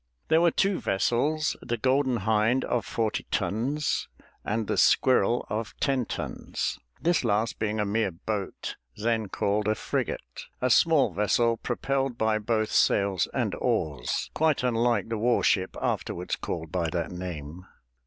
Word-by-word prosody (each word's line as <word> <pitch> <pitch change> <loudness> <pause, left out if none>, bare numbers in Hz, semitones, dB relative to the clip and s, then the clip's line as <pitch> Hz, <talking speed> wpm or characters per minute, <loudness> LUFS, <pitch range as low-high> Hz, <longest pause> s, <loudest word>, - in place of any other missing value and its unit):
There 160 +1 +5
were 170 - +5
two 195 +3 +1
vessels, 140 +10 +1
the 120 -1 -2
Golden 130 +2 +2
Hind 110 +4 +2
of 120 - -1
forty 110 -2 -1
tons, 140 +8 -1 0.4
and 110 +1 -1
the - - -1
Squirrel 125 -2 +3
of 110 +1 -4
ten 130 -4 +1
tons, - - -4 0.2
this 170 -3 +2
last 115 0 0
being 110 0 -1
a 105 - +1
mere 105 +1 +1
boat 95 +3 -5 0.2
then 110 -1 0
called 105 +2 0
a 110 - +2
frigate, - - -4
a 125 0 +1
small 145 - +4
vessel 115 +4 +2
propelled 135 +1 -1
by 110 -1 +1
both 110 0 0
sails 100 -5 +2
and - - -1
oars, 70 -6 -1
quite 155 -4 +2
unlike 115 -3 +1
the 115 -2 -2
war 120 +2 +2
ship 95 -2 +1
afterwards 90 +1 -2
called 80 -1 -5
by 85 -3 0
that 85 -1 -2
name. 90 -1 -7
110 Hz, 150 wpm, -27 LUFS, 100-125 Hz, 0.4 s, There